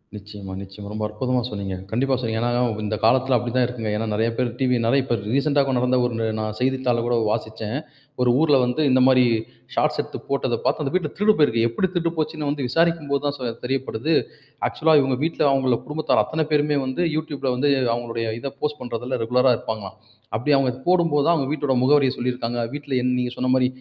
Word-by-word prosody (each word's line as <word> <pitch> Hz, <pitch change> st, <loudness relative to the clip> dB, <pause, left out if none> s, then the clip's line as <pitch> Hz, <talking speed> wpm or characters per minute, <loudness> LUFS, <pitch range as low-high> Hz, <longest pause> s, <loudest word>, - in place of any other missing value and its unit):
நிச்சயமா, 100 Hz, -2 st, -9 dB
நிச்சயமா. 100 Hz, +1 st, -10 dB
ரொம்ப 110 Hz, 0 st, -3 dB
அற்புதமா 125 Hz, +4 st, -1 dB
சொன்னீங்க. 100 Hz, -2 st, -4 dB, 0.2 s
கண்டிப்பா 130 Hz, +3 st, +1 dB
சொன்னீங்க. 110 Hz, -1 st, -2 dB
ஏன்னா 120 Hz, -, +1 dB, 0.4 s
இந்த 110 Hz, +1 st, -1 dB
காலத்துல 130 Hz, +1 st, +3 dB
அப்டித்தான் 120 Hz, +2 st, 0 dB
இருக்குங்க. 115 Hz, -4 st, -4 dB
ஏன்னா 110 Hz, 0 st, -2 dB
நெறைய 115 Hz, +2 st, +1 dB
பேர் 125 Hz, -1 st, +1 dB
டிவி 125 Hz, -2 st, +2 dB, 0.3 s
இப்ப 120 Hz, -3 st, 0 dB, 0.2 s
ரீசென்ட்டா 140 Hz, 0 st, +3 dB, 0.2 s
நடந்த 125 Hz, +1 st, +2 dB
ஒரு 115 Hz, -2 st, -1 dB
நா -, -, -1 dB, 0.2 s
செய்தித்தாள்ல 125 Hz, -2 st, +1 dB
கூட 120 Hz, -, +1 dB, 0.2 s
வாசிச்சேன். 110 Hz, +3 st, -3 dB, 0.5 s
ஒரு 125 Hz, -, +3 dB
ஊர்ல 145 Hz, -4 st, +4 dB
வந்து 125 Hz, +5 st, 0 dB
இந்த 130 Hz, 0 st, +4 dB
மாரி 125 Hz, -1 st, +5 dB, 0.5 s
ஷார்ட்ஸ் -, -, +1 dB
எடுத்து -, -, -5 dB
போட்டதப் 130 Hz, -4 st, -1 dB
பார்த்து, 155 Hz, -, +1 dB
அந்த 135 Hz, -, -1 dB
வீட்ல 185 Hz, -, +1 dB
திருடு 210 Hz, +1 st, +5 dB
போயிருக்கு. 115 Hz, -6 st, +3 dB
எப்டி 115 Hz, +11 st, 0 dB
திருடு 170 Hz, -1 st, +1 dB
போச்சுன்னு 155 Hz, -1 st, -2 dB
வந்து 140 Hz, -3 st, -2 dB
விசாரிக்கும் 165 Hz, 0 st, +1 dB
போது 140 Hz, -1 st, +1 dB
தான் 145 Hz, -, 0 dB
சொ 130 Hz, -, -7 dB, 0.2 s
தெரியப்படுது. 135 Hz, +2 st, -2 dB, 0.5 s
ஆக்சுவல்லா 160 Hz, 0 st, +2 dB
இவங்க 135 Hz, -1 st, 0 dB
வீட்ல 165 Hz, -, -2 dB
அவங்கள 130 Hz, -3 st, +2 dB
குடும்பத்தார் 155 Hz, +1 st, +1 dB
அத்தனை 160 Hz, 0 st, -1 dB
பேருமே 150 Hz, 0 st, +2 dB
வந்து, 130 Hz, +7 st, -2 dB
Youtubeல 145 Hz, -4 st, -2 dB
வந்து 145 Hz, +3 st, +1 dB, 0.2 s
அவங்களுடைய 115 Hz, -1 st, -3 dB
இத 140 Hz, -, -5 dB
போஸ்ட் 150 Hz, 0 st, -2 dB
பண்றதுல 125 Hz, +1 st, -3 dB
ரெகுலரா 125 Hz, +2 st, +3 dB
இருப்பாங்களாம். 110 Hz, -2 st, -6 dB, 0.4 s
அப்டி 125 Hz, +7 st, 0 dB
அவங்க 130 Hz, -2 st, +2 dB
போடும்போது 170 Hz, -5 st, +3 dB
தான் 170 Hz, -, +4 dB
அவங்க 135 Hz, -4 st, -1 dB
வீட்டோட 145 Hz, -3 st, 0 dB
முகவரிய 135 Hz, 0 st, +4 dB
சொல்லிருக்காங்க. 120 Hz, -1 st, -2 dB
வீட்ல 145 Hz, -2 st, -4 dB
என் 125 Hz, 0 st, +1 dB
நீங்க 125 Hz, -1 st, -2 dB
சொன்ன 130 Hz, 0 st, -1 dB
மாரி 130 Hz, -1 st, +3 dB
130 Hz, 190 wpm, -23 LUFS, 115-145 Hz, 0.5 s, மாரி